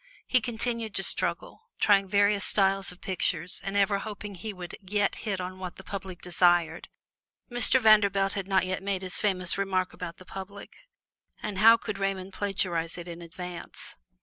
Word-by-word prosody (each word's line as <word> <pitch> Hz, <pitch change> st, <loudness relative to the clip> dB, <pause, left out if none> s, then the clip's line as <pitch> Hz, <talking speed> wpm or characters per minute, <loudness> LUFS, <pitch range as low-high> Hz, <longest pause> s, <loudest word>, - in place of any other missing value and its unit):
He 255 Hz, -, +3 dB
continued 230 Hz, -1 st, -2 dB
to 195 Hz, -, 0 dB
struggle, 455 Hz, -, -1 dB
trying 200 Hz, -2 st, +4 dB
various 205 Hz, 0 st, +3 dB
styles 195 Hz, -1 st, +2 dB
of 180 Hz, -, -16 dB
pictures 180 Hz, -2 st, 0 dB
and 195 Hz, +1 st, -2 dB
ever 200 Hz, 0 st, +3 dB
hoping 210 Hz, -1 st, -7 dB
he 215 Hz, +4 st, -6 dB
would 180 Hz, -3 st, -8 dB
yet 200 Hz, +1 st, 0 dB
hit 200 Hz, -4 st, -3 dB
on 185 Hz, +1 st, -6 dB
what 185 Hz, -1 st, -6 dB
the 190 Hz, -, -12 dB
public 190 Hz, -3 st, -7 dB
desired. 175 Hz, -2 st, +2 dB, 0.6 s
Mr. 245 Hz, +2 st, +4 dB
Vanderbilt 200 Hz, -3 st, +4 dB
had 195 Hz, -2 st, -3 dB
not 190 Hz, -1 st, +2 dB
yet 185 Hz, 0 st, -2 dB
made 195 Hz, -1 st, -2 dB
his 185 Hz, 0 st, -2 dB
famous 185 Hz, -3 st, +1 dB
remark 185 Hz, -2 st, 0 dB
about 170 Hz, -2 st, -7 dB
the 185 Hz, -, -14 dB
public, 200 Hz, -, -10 dB, 0.5 s
and 205 Hz, -3 st, -3 dB
how 225 Hz, +2 st, +8 dB
could 210 Hz, -3 st, -5 dB
Raymond 195 Hz, -1 st, -2 dB
plagiarize 180 Hz, -5 st, -1 dB
it 175 Hz, 0 st, -7 dB
in 170 Hz, 0 st, -8 dB
advance? 175 Hz, +1 st, -8 dB
195 Hz, 175 wpm, -28 LUFS, 180-205 Hz, 0.6 s, how